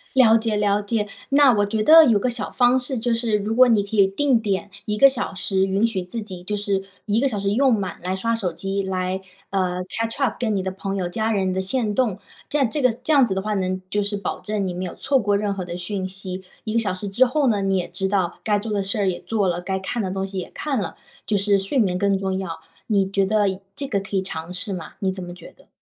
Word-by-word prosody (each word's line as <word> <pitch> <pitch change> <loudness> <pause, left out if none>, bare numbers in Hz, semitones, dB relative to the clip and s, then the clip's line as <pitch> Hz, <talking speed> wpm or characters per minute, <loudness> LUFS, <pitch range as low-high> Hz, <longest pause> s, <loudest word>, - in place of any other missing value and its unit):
了 230 -4 +7
解 220 -1 -1
了 205 0 +2
解， 210 0 -1 0.2
那 280 -2 +6
我 205 -2 +2
觉 215 +1 -1
得 320 +6 +9
有 230 -6 +4
个 225 +5 0
小 230 -3 -3
方 245 +1 +4
式， 255 +1 -3
就 235 +1 0
是 230 -2 +1
如 210 +2 -2
果 255 +1 +7
你 220 -4 +3
可 200 +2 -6
以 200 -2 +6
定 250 +5 +2
点， 200 -2 -2
1 210 0 -2
个 275 - +8
小 255 -6 -2
时 190 +1 0
允 195 +3 +2
许 220 -5 -1
自 200 +6 -5
己 185 -4 -8
就 210 +3 -2
是 200 -1 -1 0.2
1 215 +2 +1
个 275 - +3
小 215 -6 -2
时 200 0 0
用 265 +5 +3
满 200 -5 -1
来 185 +1 -1
刷 230 +4 0
手 195 -6 -2
机 195 +3 -3
来 190 0 -2 0.3
呃， 185 -2 0
catch 225 +4 -3
up 270 -5 +1
跟 220 -4 0
你 190 - -1
的 190 - -2
朋 195 +1 -4
友 185 -2 -1
家 220 +5 -1
人 190 -3 0
的 190 - -1
限 210 +2 0
动， 215 -4 +1 0.3
这 295 - 0
样 275 -4 +3
这 295 - -2
个 255 -2 +4
这 250 +7 -2
样 280 -2 +6
子 205 -6 +1
的 190 - -1
话 210 +2 -2
呢， 185 -2 -1
就 205 - +1
是 205 0 -2
保 200 - -4
证 210 -2 -2
你 185 - -2
没 180 +1 -4
有 180 - -6
错 275 -2 +2
过 205 -3 +1
任 205 -1 -1
何 195 -2 -4
的 175 0 -6
讯 185 +1 -3
息。 190 0 -7 0.2
1 215 - -4
个 230 - +3
小 220 -3 0
时 185 +2 -5
之 205 +7 +4
后 275 +3 +1
呢， 210 -4 +2
你 195 0 +1
也 180 - -2
知 195 - -2
道 190 -3 -1
该 210 -1 +2
做 215 +2 -4
的 200 - +1
事 200 +4 -2
儿 200 -2 +1
也 180 -2 -1
做 210 -4 0
了， 175 0 -1
该 190 +1 -2
看 190 +5 -3
的 190 - -2
东 190 0 -2
西 195 -1 -5
也 180 - -6
看 280 -5 -2
了， 180 - -5 0.3
就 210 - +2
是 200 0 +3
睡 195 +8 -2
眠 185 -7 +2
更 200 0 +2
重 190 -1 -2
要， 165 -4 -5 0.3
你 200 -3 +2
觉 195 0 +1
得 200 -2 +1
这 280 - -3
个 200 -6 0
可 195 0 -3
以 190 - 0
尝 165 -2 -6
试 185 +2 -3
吗？ 175 -3 -7
你 190 -1 0
怎 190 -1 -6
么 175 0 -8
觉 175 - -12
得？ - - -23
200 Hz, 305 characters per minute, -22 LUFS, 190-225 Hz, 0.3 s, 得